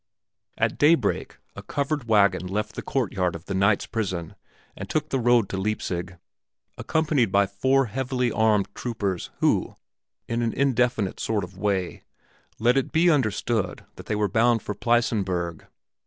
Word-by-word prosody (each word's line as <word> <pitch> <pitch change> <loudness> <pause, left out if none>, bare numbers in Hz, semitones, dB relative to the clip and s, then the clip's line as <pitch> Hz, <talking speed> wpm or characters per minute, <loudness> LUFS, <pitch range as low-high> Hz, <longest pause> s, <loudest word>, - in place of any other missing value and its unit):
At 115 0 0
daybreak 145 -8 +2 0.2
a - - -7
covered 140 -2 -2
wagon 100 -4 +3
left 105 +3 -3
the - - -5
courtyard 95 -9 -1
of 85 +2 -9
the 100 - -4
knight's 100 +2 +2
prison 95 -7 -3 0.4
and - - -7
took 155 0 -1
the 135 - 0
road 120 -3 +3
to 95 - -3
Leipzig, 90 -3 -3 0.6
accompanied 150 -9 +1
by 100 +1 +4
four 130 +8 +1
heavily 125 +1 -1
armed 110 -3 +2
troopers 100 -7 -3
who, - - +1 0.5
in 115 +1 -1
an 115 -1 0
indefinite 125 -7 +1
sort 110 -3 -1
of 90 +1 -9
way, 95 -3 -1 0.6
let 120 +4 +3
it 135 - 0
be 170 +2 +4
understood 110 - -1
that - - -12
they - - -1
were 105 0 +1
bound 115 +3 +2
for 105 - -3
the 105 - -22
Pleissenburg. 95 -8 0
110 Hz, 155 wpm, -25 LUFS, 100-125 Hz, 0.6 s, by